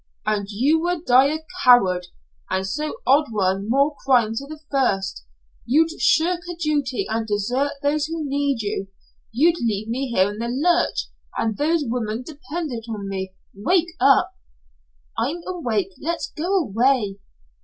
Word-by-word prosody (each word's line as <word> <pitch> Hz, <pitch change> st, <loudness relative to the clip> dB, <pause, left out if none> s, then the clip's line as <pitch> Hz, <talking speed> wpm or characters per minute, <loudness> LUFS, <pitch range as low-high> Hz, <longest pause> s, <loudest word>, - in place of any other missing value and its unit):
"And 210 Hz, -2 st, -1 dB
you 265 Hz, +10 st, +2 dB
would 350 Hz, -1 st, -2 dB
die 255 Hz, +2 st, +6 dB
a 315 Hz, +1 st, -4 dB, 0.2 s
coward, 185 Hz, -8 st, +5 dB, 0.4 s
and 190 Hz, 0 st, -1 dB
so 300 Hz, -, -3 dB
add 290 Hz, +3 st, +5 dB
one 195 Hz, -1 st, 0 dB
more 280 Hz, +4 st, +2 dB
crime 240 Hz, -5 st, +3 dB
to 275 Hz, +5 st, -5 dB
the 310 Hz, +1 st, -9 dB
first. 195 Hz, -, 0 dB, 0.4 s
You'd 320 Hz, +6 st, +3 dB
shirk 345 Hz, +2 st, +3 dB
a -, -, -6 dB
duty, 295 Hz, -6 st, -1 dB
and 220 Hz, 0 st, -2 dB
desert 245 Hz, +7 st, 0 dB
those 295 Hz, +1 st, +1 dB
who 320 Hz, -2 st, -4 dB
need 280 Hz, -4 st, 0 dB
you. 200 Hz, -1 st, -3 dB, 0.4 s
You'd 325 Hz, +8 st, +3 dB
leave 215 Hz, -1 st, -1 dB
me 255 Hz, +2 st, -2 dB
in 205 Hz, +3 st, +2 dB
the 235 Hz, -, -2 dB
lurch, 340 Hz, +8 st, +1 dB, 0.3 s
and 220 Hz, -2 st, 0 dB
those 315 Hz, +4 st, +1 dB
women 230 Hz, -1 st, -2 dB
dependent 295 Hz, -4 st, -6 dB
on 205 Hz, -3 st, -5 dB
me 190 Hz, -1 st, -4 dB, 0.2 s
wake 345 Hz, -, +1 dB
up 270 Hz, +2 st, +4 dB, 0.5 s
" -, -, -39 dB
"I'm 335 Hz, +6 st, -2 dB
awake. 235 Hz, -, -2 dB
Let's 335 Hz, +2 st, -3 dB
go 335 Hz, +5 st, -2 dB
away." 235 Hz, -, +1 dB
255 Hz, 155 wpm, -22 LUFS, 210-305 Hz, 0.5 s, die